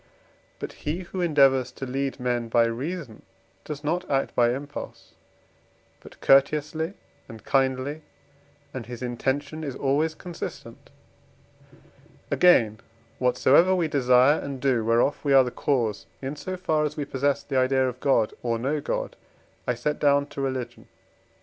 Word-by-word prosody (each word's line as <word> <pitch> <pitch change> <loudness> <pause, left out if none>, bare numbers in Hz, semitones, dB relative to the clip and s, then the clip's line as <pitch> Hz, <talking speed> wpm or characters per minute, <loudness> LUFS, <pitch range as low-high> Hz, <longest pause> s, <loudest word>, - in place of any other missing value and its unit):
But - - -6 0.2
he, 170 +5 -2
who 185 +1 -5
endeavours 135 -6 +3
to 135 - -6
lead 135 +1 -3
men 120 -1 -1
by 115 0 +4
reason, 130 +1 -5 0.4
does 150 -1 -7
not 165 +4 -2
act 135 -1 0
by 120 -1 +3
impulse 140 +4 -6 0.9
but - - -15
courteously 150 +5 +2 0.3
and 110 -2 -11
kindly, 135 +3 0 0.7
and 120 -4 -6
his 125 0 -7
intention 140 +5 -2
is 140 -4 -4
always 150 +4 0
consistent. 175 0 -8 1.4
Again, 115 -12 +4 0.4
whatsoever 145 +8 +4
we 175 -3 +1
desire 130 0 +4
and 140 -2 -6
do, 125 -4 +1
whereof 115 +5 +2
we 140 -2 +2
are 135 -1 +8
the 125 - -4
cause 120 -8 -1
in 135 +2 -5
so 185 +5 -5
far 155 -4 0
as 150 0 -3
we 145 - -2
possess 140 +1 0
the 135 - -2
idea 130 0 +2
of 125 0 -5
God, 125 -6 +2
or 115 -1 -1
know 140 +6 -1
God, - - -3 0.5
I 125 - +1
set 150 +6 -2
down 140 -1 +3
to 140 - -6
Religion. 130 -3 -4
135 Hz, 150 wpm, -25 LUFS, 125-150 Hz, 1.4 s, are